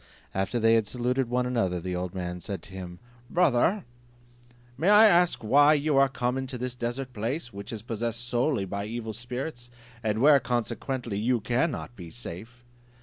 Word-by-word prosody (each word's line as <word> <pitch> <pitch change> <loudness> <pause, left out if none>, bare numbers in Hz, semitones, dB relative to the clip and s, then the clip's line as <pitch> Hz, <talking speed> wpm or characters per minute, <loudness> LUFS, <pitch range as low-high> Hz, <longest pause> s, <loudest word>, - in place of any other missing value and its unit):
After 95 +5 -1
they 115 0 +4
had 110 -2 +3
saluted 125 +2 -1
one 125 +1 +1
another, 115 -8 0
the 90 +1 -4
old 90 +1 -4
man 90 -1 -4
said 100 0 -5
to - - -14
him, 90 -2 -7 0.3
"Brother, 175 - +2 0.9
may 160 +9 +1
I 210 +1 +8
ask 175 - +4
why 145 +7 +6
you 150 0 +1
are 135 0 +5
come 125 0 -1
into 130 -1 -5
this 125 0 -4
desert 125 +2 -4
place, 120 +4 -3
which 100 +2 -7
is 115 -2 -6
possessed 115 +1 -3
solely 120 -3 +1
by 100 +2 -4
evil 110 0 -5
spirits, 120 +2 -6 0.3
and 110 -2 0
where 145 +2 +7
consequently 120 -1 -2
you 120 +3 +1
cannot 125 +2 -1
be 85 -5 -9
safe? 115 +4 -9
120 Hz, 175 wpm, -27 LUFS, 105-130 Hz, 0.9 s, I